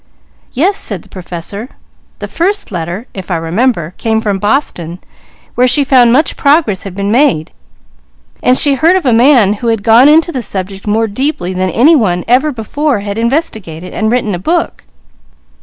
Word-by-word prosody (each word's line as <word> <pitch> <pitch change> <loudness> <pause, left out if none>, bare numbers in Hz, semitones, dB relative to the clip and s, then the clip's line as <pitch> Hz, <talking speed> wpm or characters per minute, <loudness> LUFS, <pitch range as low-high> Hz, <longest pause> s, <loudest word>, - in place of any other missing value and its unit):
"Yes," 365 +10 +1
said 195 -6 -1
the - - -20
Professor, 185 +5 -6 0.5
"the - - -6
first 395 - -2
letter, 175 +5 -5
if 190 -3 -8
I 180 - 0
remember, 170 +1 -1
came 220 -1 0
from 205 -3 -2
Boston, 190 - -2 0.6
where 250 +1 +2
she 280 +3 +3
found 255 -3 +4
much 280 +5 +2
progress 280 - +1
had 195 -2 -8
been 200 +1 -2
made; 235 - +1 0.9
there 250 - +3
she 280 +2 +4
heard 325 +7 +3
of 375 - -1
a 250 - +3
man 235 -4 +4
who 240 - -2
had 225 -3 0
gone 235 +6 +5
into 325 +3 +3
the 260 - -4
subject 195 -1 -6
more 220 +2 +1
deeply 220 - -3
than 185 0 -1
any 285 - +4
one 180 - 0
ever 265 +6 +2
before 255 +1 -2
had 205 +1 -5
investigated, 220 - -3
and 220 0 -1
written 230 -4 0
a 175 - -3
book. 335 - -2
225 Hz, 175 wpm, -12 LUFS, 190-275 Hz, 0.9 s, gone